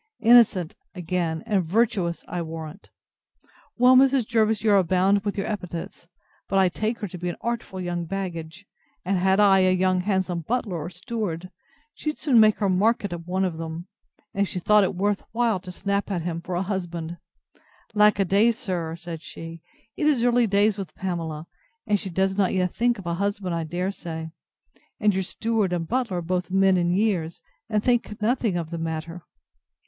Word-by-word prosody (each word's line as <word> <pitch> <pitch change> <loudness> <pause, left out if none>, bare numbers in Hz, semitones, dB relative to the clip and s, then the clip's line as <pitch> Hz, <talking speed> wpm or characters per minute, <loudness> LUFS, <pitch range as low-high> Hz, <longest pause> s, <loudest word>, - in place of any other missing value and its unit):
Innocent! 225 -7 +5 0.2
again, 170 -2 -2
and 200 -3 +1
virtuous, 185 -2 0
I 175 - -3
warrant! 160 +2 -8 0.9
Well, 250 +1 +6
Mrs. 265 -2 +5
Jervis, 220 -2 +2
you 215 -2 +4
abound 190 +1 +3
with 205 -1 -3
your 195 - -1
epithets; 180 -5 -6 0.4
but 195 - +1
I 190 -1 +5
take 215 +6 -2
her 205 - -2
to 180 -1 -9
be 180 +1 -2
an 175 - -4
artful 235 -5 -3
young 175 -1 -3
baggage; 175 -1 -5 0.4
and 190 0 +1
had 190 +2 +3
I 195 -2 +6
a 185 0 +4
young 185 0 +2
handsome 190 -2 0
butler 205 +1 -2
or 155 +3 -5
steward, 185 -3 -5 0.4
she'd 305 0 -4
soon 255 -6 +3
make 215 -1 +6
her 205 - 0
market 200 +1 +1
of 170 0 -7
one 190 +1 0
of 165 -3 -3
them, 165 +1 -5 0.5
if 200 -1 +1
she - - -5
thought 210 +3 +4
it 190 - -1
worth 200 +2 0
while 230 -4 +1
to 180 0 -9
snap 200 +2 -2
at 180 -5 -2
him 170 -1 -3
for 175 +1 -5
a 180 - 0
husband. 175 -3 -4 0.8
Alack 210 0 +5
a 195 - +2
day, 205 +6 +4
sir, 180 -8 -3
said 170 -2 -8
she, 165 0 -9 0.3
it 300 - 0
is 275 -6 +3
early 245 -1 +3
days 205 +1 +2
with 185 -5 -7
Pamela; 165 -4 -4 0.4
and 205 -1 +1
she 190 - -5
does 190 +2 0
not 195 -1 +1
yet 180 -1 0
think 240 +1 +1
of 195 - -10
a 170 - -1
husband, 200 0 -2
I 165 -1 -2
dare 180 +4 -2
say: 160 -4 -7 0.7
and 210 -1 +3
your 190 - 0
steward 215 +1 -1
and 170 -2 -2
butler 240 -5 -1
are - - -2
both 180 +2 -2
men 190 0 +4
in 175 -1 +1
years, 185 -6 0 0.3
and 215 -1 0
think 240 -4 0
nothing 220 -3 +1
of 165 -1 -4
the 170 - -4
matter. 165 +1 -5
190 Hz, 190 wpm, -25 LUFS, 175-210 Hz, 0.9 s, Well